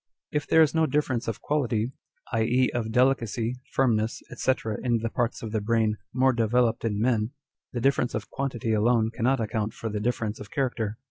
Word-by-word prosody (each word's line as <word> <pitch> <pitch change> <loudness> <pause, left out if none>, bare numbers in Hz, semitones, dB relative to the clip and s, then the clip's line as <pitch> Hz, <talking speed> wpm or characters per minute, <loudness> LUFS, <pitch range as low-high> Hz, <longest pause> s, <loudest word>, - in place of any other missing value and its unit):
If 150 -1 -1
there 160 - +6
is 155 - +1
no 160 -1 +3
difference 135 -6 0
of 115 0 -3
quality; 125 -6 0 0.4
i. 115 -2 +1
e., 125 +3 +2
of 115 -2 -2
delicacy, 125 -1 +1
firmness, 115 -4 +1
&c. 130 - +2 0.3
in 120 -2 +2
the 115 0 -3
parts 120 -1 -1
of 110 - -4
the 110 -1 0
brain 110 0 +1
"more 130 +1 +3
developed 115 0 +2
in 105 -3 -1
men," 115 +1 +1 0.4
the 120 - -3
difference 135 -1 +2
of 110 - -5
quantity 120 -5 -2
alone 110 +1 +3
cannot 125 +3 +1
account 110 -1 -2
for 115 - -4
the 105 0 -2
difference 110 -1 -1
of 105 - -9
character. 120 -6 -1
115 Hz, 190 wpm, -26 LUFS, 110-130 Hz, 0.4 s, there